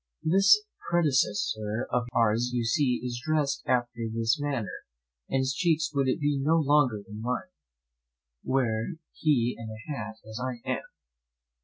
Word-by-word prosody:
"This 195 +5 +5 0.3
predecessor 120 -8 +1
of 125 -1 0
ours, 115 +1 +2
you 120 -1 0
see, 125 +1 +2
is 120 -1 -4
dressed 150 -3 0
after 120 -2 0
this 115 +6 +1
manner, 135 -10 -3 0.4
and 135 - +1
his 130 0 0
cheeks 155 -1 +1
would 140 -1 +2
be 145 +2 +1
no 155 +4 +3
larger 145 -8 +3
than 105 0 -8
mine, 125 +10 -3 0.9
were 120 +1 0 0.2
he 125 -6 +1
in 115 -1 -8
a 115 +7 -6
hat 110 -2 -6
as 110 +1 -6
I 125 -2 -5
am. - - 0
125 Hz, 145 wpm, -28 LUFS, 115-145 Hz, 0.9 s, This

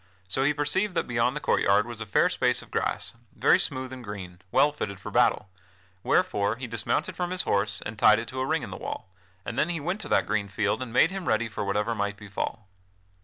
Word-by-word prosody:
So 115 +8 0
he 145 - +4
perceived 165 +7 0
that 165 - +1
beyond 120 +2 +1
the - - -2
court - - +1
yard 100 +2 +4
was 120 -1 -8
a 110 - -5
fair 100 - +4
space - - +1
of - - -18
grass, - - -1 0.2
very - - +4
smooth 130 0 -2
and 130 -1 -8
green, 95 -4 -8
well 145 +2 +5
fitted 100 -9 -5
for - - -7
battle, 105 - +3 0.5
wherefore 100 +3 +2
he 130 +2 -6
dismounted 115 -2 -1
from 180 -1 -2
his 185 0 -2
horse 100 0 +1
and 105 0 -6
tied 110 0 +7
it 115 +1 -4
to 130 0 -5
a 130 - 0
ring - - 0
in - - -6
the - - -6
wall, - - -6 0.4
and 120 - -3
then 155 - +2
he 170 -2 -1
went 180 +8 -2
to - - -7
that - - +3
green 105 -2 0
field 100 +5 -1
and 130 -3 -5
made 140 +8 +4
him 190 -3 -5
ready 115 +2 +2
for 110 - -4
whatever 105 +3 0
might 100 -1 -2
befall. 105 +1 -5
115 Hz, 240 wpm, -27 LUFS, 100-140 Hz, 0.5 s, tied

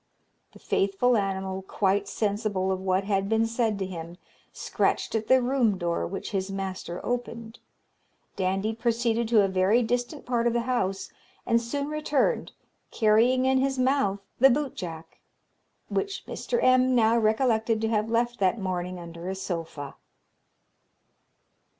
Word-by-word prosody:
The - - -14
faithful 200 +6 +1
animal, 190 -2 -2
quite 195 +1 0
sensible 205 -3 -1
of 190 - -1
what 190 0 +1
had 195 -1 0
been 225 0 +2
said 225 -2 0
to 195 - -2
him, 170 -2 -7 0.3
scratched - - -1
at 220 -1 -1
the 260 -1 +5
room 240 -6 +2
door, 170 -2 -1
which 195 +5 -6
his 195 -1 -2
master 190 -2 -5
opened. 235 -1 -4 0.8
Dandie 195 +3 -1
proceeded 230 0 0
to 220 -3 +4
a - - +2
very 190 +5 +2
distant 245 +5 -2
part 240 -1 +1
of 235 - +1
the 235 - +1
house, 195 -6 -2 0.3
and 230 0 +2
soon 280 +5 -3
returned, 305 - 0 0.4
carrying 235 +4 +3
in 265 0 +3
his 270 0 0
mouth 255 -6 +1 0.2
the 270 +2 +7
bootjack, 180 - -4 0.7
which 395 -1 -3
Mr. 480 - -3
M. 255 0 +4
now 225 -1 +4
recollected 225 0 +2
to 220 - 0
have 215 0 0
left 240 +1 0
that 195 +3 +2
morning 180 -1 -3
under 170 +1 -8
a 190 - -3
sofa. 165 -7 -5
220 Hz, 145 wpm, -26 LUFS, 190-240 Hz, 0.8 s, the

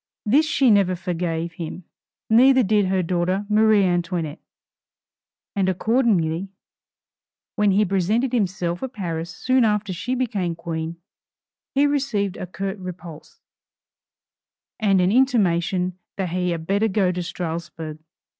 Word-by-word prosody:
This 285 +9 +4
she 270 -5 +3
never 195 -3 +3
forgave 170 -2 -3
him, 170 +2 -7 0.4
neither 260 +3 +6
did 205 -1 +2
her 185 -1 +1
daughter 180 +3 0
Marie 215 -1 +4
Antoinette; 175 -4 -1 1.2
and 190 -2 +1
accordingly, 190 -4 +1 1.1
when 210 -2 +3
he 200 +2 +3
presented 205 +7 0
himself 180 -6 -1
at 265 -1 -5
Paris 170 -5 -4
soon 255 +9 +1
after 210 -3 0
she 250 +8 -3
became 205 -9 -1
Queen, 165 0 -4 0.8
he 280 +1 +4
received 265 -10 0
a 185 - -6
curt 195 +2 -5
repulse, 175 -3 -10 1.4
and 200 -4 +3
an 180 +1 +2
intimation 185 -7 +1 0.2
that 190 -3 -2
he 180 +1 -1
had 165 -2 -3
better 200 +5 +1
go 190 -3 +1
to 180 0 -3
Strasburg. 165 -2 -5
190 Hz, 125 wpm, -23 LUFS, 175-215 Hz, 1.4 s, neither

